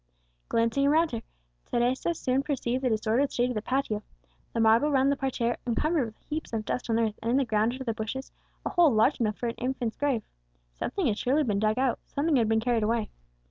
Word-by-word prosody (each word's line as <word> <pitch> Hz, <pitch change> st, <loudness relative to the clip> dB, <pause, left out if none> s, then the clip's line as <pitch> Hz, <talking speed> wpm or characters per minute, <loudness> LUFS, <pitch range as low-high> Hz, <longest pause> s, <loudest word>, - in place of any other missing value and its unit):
Glancing 230 Hz, +5 st, +2 dB
around 320 Hz, +3 st, +3 dB
her, 230 Hz, -2 st, -3 dB, 0.5 s
Teresa 255 Hz, +8 st, +1 dB
soon 260 Hz, -3 st, 0 dB
perceived 260 Hz, -3 st, -2 dB
the 255 Hz, -, +2 dB
disordered 225 Hz, +5 st, +1 dB
state 245 Hz, +1 st, +1 dB
of -, -, -1 dB
the 215 Hz, -, -2 dB
patio; 250 Hz, -3 st, -1 dB, 0.5 s
the -, -, -2 dB
marble 225 Hz, +6 st, +5 dB
round 270 Hz, 0 st, +3 dB
the -, -, +2 dB
parterre 245 Hz, -3 st, -1 dB
encumbered 285 Hz, +3 st, +1 dB
with 220 Hz, -, -12 dB
heaps 310 Hz, -4 st, -4 dB
of 220 Hz, -1 st, -2 dB
dust 250 Hz, -, -3 dB
and 225 Hz, -, +2 dB
earth, 220 Hz, -2 st, -1 dB
and 230 Hz, -, -2 dB
in 250 Hz, -, +3 dB
the 275 Hz, -, +2 dB
ground 220 Hz, +1 st, +1 dB
under 260 Hz, +1 st, -6 dB
the 230 Hz, -3 st, -1 dB
bushes 220 Hz, +5 st, -5 dB, 0.3 s
a -, -, 0 dB
hole 345 Hz, -4 st, +5 dB
large 225 Hz, +5 st, +3 dB
enough 215 Hz, -3 st, 0 dB
for -, -, -4 dB
an 230 Hz, -, -3 dB
infant's 250 Hz, -2 st, -2 dB
grave. 275 Hz, -7 st, 0 dB, 0.5 s
Something 345 Hz, -, -2 dB
had 220 Hz, -5 st, +1 dB
surely 280 Hz, +5 st, +2 dB
been 210 Hz, -6 st, 0 dB
dug 215 Hz, +2 st, +1 dB
out, 260 Hz, -1 st, +1 dB
something 300 Hz, +2 st, 0 dB
had 225 Hz, -3 st, +2 dB
been 220 Hz, 0 st, +3 dB
carried 235 Hz, 0 st, +1 dB
away. 220 Hz, 0 st, 0 dB
245 Hz, 220 wpm, -28 LUFS, 225-275 Hz, 0.5 s, marble